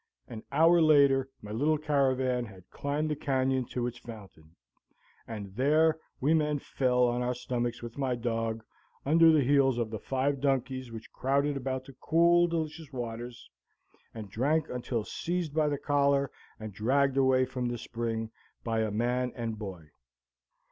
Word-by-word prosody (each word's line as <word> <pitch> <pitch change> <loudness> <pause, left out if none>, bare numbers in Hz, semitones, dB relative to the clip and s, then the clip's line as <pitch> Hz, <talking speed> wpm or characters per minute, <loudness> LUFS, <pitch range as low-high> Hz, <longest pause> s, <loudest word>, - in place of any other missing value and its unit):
An 110 - -8
hour 165 +4 +5
later 140 -4 +4
my 105 - -8
little 145 +8 +1
caravan 130 -4 +1
had 95 -4 -14
climbed 150 +2 -2
the - - 0
canyon 130 -2 0
to 120 +1 -3
its 120 0 -5
fountain, 95 -9 -12 0.7
and 100 -4 -7
there 155 +5 +3 0.2
we 145 +5 +2
men 150 -2 +2
fell 125 -2 0
on 120 +1 -1
our 125 0 -1
stomachs 120 -1 -3
with 120 +3 -8
my 130 -2 0
dog, 115 -1 -2 0.4
under 165 +3 +6
the 155 -3 +4
heels 135 -1 +3
of 115 -2 -2
the 110 - -4
five 135 +3 -1
donkeys 130 -2 -1
which 110 -1 -9
crowded 140 +2 0
about 130 -1 -3
the 135 - -12
cool, 170 +1 +4
delicious 160 -2 -4
waters, 120 -1 -6 0.6
and 105 -4 -9
drank 145 +9 +1
until 120 -2 -3
seized 170 +4 -3
by 155 -1 +2
the 145 - -1
collar 140 -1 +1 0.3
and 110 -2 -7
dragged 135 +6 +1
away 130 -1 +3
from 125 -1 -3
the 120 0 -3
spring 115 -1 -4 0.3
by 115 -1 -1
a 110 -1 0
man 120 +4 0
and 115 -3 -4
boy. 90 -8 -8
130 Hz, 160 wpm, -29 LUFS, 115-145 Hz, 0.7 s, under